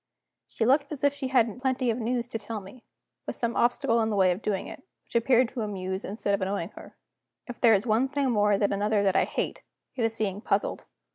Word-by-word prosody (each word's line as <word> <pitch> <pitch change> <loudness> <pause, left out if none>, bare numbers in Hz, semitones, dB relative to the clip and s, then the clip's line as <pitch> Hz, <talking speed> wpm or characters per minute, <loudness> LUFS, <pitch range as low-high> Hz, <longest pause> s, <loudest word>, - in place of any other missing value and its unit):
She 225 - -2
looked 280 +4 +3
as 290 -3 -6
if 285 0 +4
she 280 -2 -4
had 245 -2 +1
plenty 260 -2 +1
of 225 - -3
news 240 +1 -1
to 225 - -4
tell 220 +1 -5
me 200 +5 -13 0.4
with - - -3
some 235 -1 -1
obstacle 240 -1 +2
in 220 - +1
the 210 - -1
way 190 -2 +4
of 180 +4 -3
doing 200 -4 -2
it, 300 - -9 0.2
which - - -15
appeared 245 +1 +4
to 250 - -5
amuse 190 -2 -3
instead 205 0 -2
of 200 - 0
annoying 190 -2 -2
her. - - -14 0.5
If 245 -2 -9
there 230 -3 +7
is 200 +3 -1
one 230 +3 +2
thing 275 -1 0
more 210 -2 +3
than 200 0 +1
another 205 +1 +1
that 195 -1 +2
I - - +4
hate, - - -3 0.3
it 250 - -1
is 225 0 0
being 205 -2 -2
puzzled. - - -1
225 Hz, 235 wpm, -27 LUFS, 205-250 Hz, 0.5 s, there